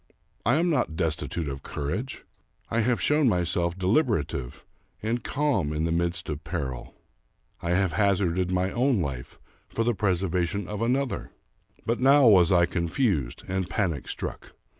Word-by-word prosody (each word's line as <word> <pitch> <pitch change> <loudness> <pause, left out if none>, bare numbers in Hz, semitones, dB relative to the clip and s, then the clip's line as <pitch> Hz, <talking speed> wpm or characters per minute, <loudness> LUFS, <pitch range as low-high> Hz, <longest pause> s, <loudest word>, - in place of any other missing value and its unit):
I 120 - +5
am 170 +2 +2
not 80 - 0
destitute 80 0 -1
of 70 -1 -5
courage. 110 - -4 0.5
I 115 - +1
have 120 +1 +2
shown 150 -3 +3
myself 90 -2 0
de 95 - -4
liberative 90 - 0 0.4
and 115 +2 -1
calm 135 - 0
in 75 +1 -1
the 85 - 0
midst 85 +1 -1
of 75 0 -4
peril. 70 -6 -5 0.7
I 85 - -3
have 95 -2 +1
hazarded 95 -2 +1
my 90 +1 0
own 125 -2 +2
life 70 -7 -4 0.3
for 115 - -1
the 120 +1 +2
preservation 95 -1 0
of 105 0 -5
another; 130 +3 0 0.6
but 115 +1 0
now 135 +2 +6
was 95 -7 +6
I 85 -2 +5
confused 85 - -1
and 95 -1 -2
panic 85 -9 -1
struck. - - -6
95 Hz, 155 wpm, -26 LUFS, 85-115 Hz, 0.7 s, now